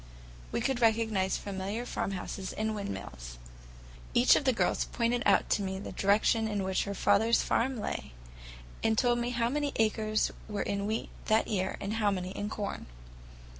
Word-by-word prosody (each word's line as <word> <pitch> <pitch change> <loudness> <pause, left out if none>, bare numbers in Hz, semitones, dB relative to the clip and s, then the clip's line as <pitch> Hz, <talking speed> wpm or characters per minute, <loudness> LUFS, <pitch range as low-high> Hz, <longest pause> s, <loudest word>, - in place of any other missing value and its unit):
We - - -1
could 265 -2 0
recognize 220 -4 +2
familiar 200 +4 -4
farmhouses 190 -3 -4
and 220 0 -1
windmills. 65 - -6 0.8
Each 240 +1 +7
of 285 - 0
the 260 - +5
girls 235 - +1
pointed 240 0 0
out - - +4
to - - +3
me 190 -1 -3
the 195 - -6
direction 220 +3 +2
in 205 -2 -1
which 190 0 0
her 200 0 -4
father's 210 +4 +3
farm 250 +1 0
lay, 205 - -4 0.7
and 220 0 +2
told 240 0 +3
me 240 0 -1
how 240 -1 +1
many 290 +1 -1
acres 215 -1 +1 0.2
were 205 -1 -2
in 200 0 -2
wheat 220 +1 -2 0.2
that 220 0 +3
year 190 -3 -1
and 200 +2 -3
how 210 - +4
many 185 -2 -2
in 205 +1 -4
corn. 205 -2 -4
215 Hz, 170 wpm, -30 LUFS, 195-230 Hz, 0.8 s, Each